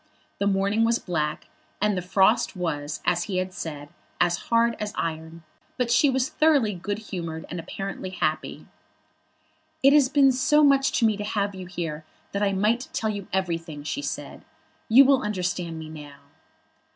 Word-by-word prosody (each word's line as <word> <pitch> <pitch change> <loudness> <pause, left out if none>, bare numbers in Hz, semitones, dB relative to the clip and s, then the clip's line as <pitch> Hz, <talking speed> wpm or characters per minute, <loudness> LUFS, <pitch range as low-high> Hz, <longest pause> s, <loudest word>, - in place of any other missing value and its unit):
The 200 - +1
morning 200 +3 +2
was 230 +1 +3
black, 155 -7 -3 0.3
and 210 0 +1
the 180 - -2
frost 190 +5 +2
was, 155 -4 -3
as 175 0 +1
he 190 -3 -3
had 185 0 -2
said, 145 -4 -6 0.3
as 175 0 +2
hard 230 0 +3
as 210 -1 -4
iron, 160 0 -4 0.3
but 245 -2 0
she 285 +4 +5
was 260 -1 +1
thoroughly 300 -8 +2
good 200 +3 -4
humoured, 170 -7 -6
and 175 - -4
apparently 195 +3 -6
happy. 155 -4 -2 1.2
"It 275 +1 +7
has 285 -3 +5
been 275 -2 +5
so 295 +4 +3
much 275 -1 +4
to 235 - +2
me 215 -2 +2
to 210 - -4
have 205 -1 -1
you 185 -1 -8
here, 165 -4 -5 0.3
that 200 - -2
I 200 -1 +2
might 215 +6 +1
tell 220 -1 -1
you 200 -2 -6
everything," 165 -5 -3
she 275 - -3
said. - - -6 0.5
"You 260 +5 +8
will 270 -1 +4
understand 180 -4 -3
me 160 -1 -7
now." 150 -2 -10
195 Hz, 175 wpm, -25 LUFS, 170-230 Hz, 1.2 s, You